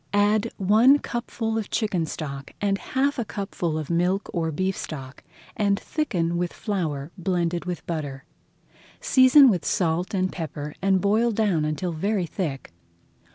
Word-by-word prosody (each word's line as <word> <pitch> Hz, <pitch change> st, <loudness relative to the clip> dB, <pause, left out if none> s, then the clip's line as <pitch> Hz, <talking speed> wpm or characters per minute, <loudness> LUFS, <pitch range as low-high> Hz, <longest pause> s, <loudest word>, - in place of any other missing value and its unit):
Add 205 Hz, +1 st, +2 dB
one 220 Hz, +8 st, +5 dB
cupful 230 Hz, -4 st, -3 dB
of 215 Hz, -, -5 dB
chicken 190 Hz, -8 st, 0 dB
stock 140 Hz, -3 st, -6 dB
and 200 Hz, -1 st, 0 dB
half 275 Hz, +1 st, 0 dB
a -, -, +1 dB
cupful 190 Hz, -6 st, -3 dB
of 155 Hz, 0 st, -4 dB
milk 180 Hz, +4 st, 0 dB
or 165 Hz, -2 st, -1 dB
beef 185 Hz, +4 st, -1 dB
stock, 135 Hz, -4 st, -7 dB, 0.3 s
and 200 Hz, -1 st, +1 dB
thicken 175 Hz, -, -1 dB
with 175 Hz, 0 st, -1 dB
flour 160 Hz, -8 st, -3 dB
blended 175 Hz, -1 st, -1 dB
with 180 Hz, -1 st, -5 dB
butter. 145 Hz, -5 st, -4 dB, 0.7 s
Season 265 Hz, +2 st, +7 dB
with 185 Hz, -8 st, +2 dB
salt 175 Hz, +2 st, 0 dB
and 185 Hz, 0 st, 0 dB
pepper 150 Hz, -3 st, -5 dB
and 190 Hz, -1 st, +3 dB
boil 215 Hz, +4 st, +3 dB
down 200 Hz, -8 st, +1 dB
until 155 Hz, +4 st, -2 dB
very 195 Hz, +4 st, -1 dB
thick. 150 Hz, -, -4 dB
185 Hz, 150 wpm, -25 LUFS, 160-210 Hz, 0.7 s, Season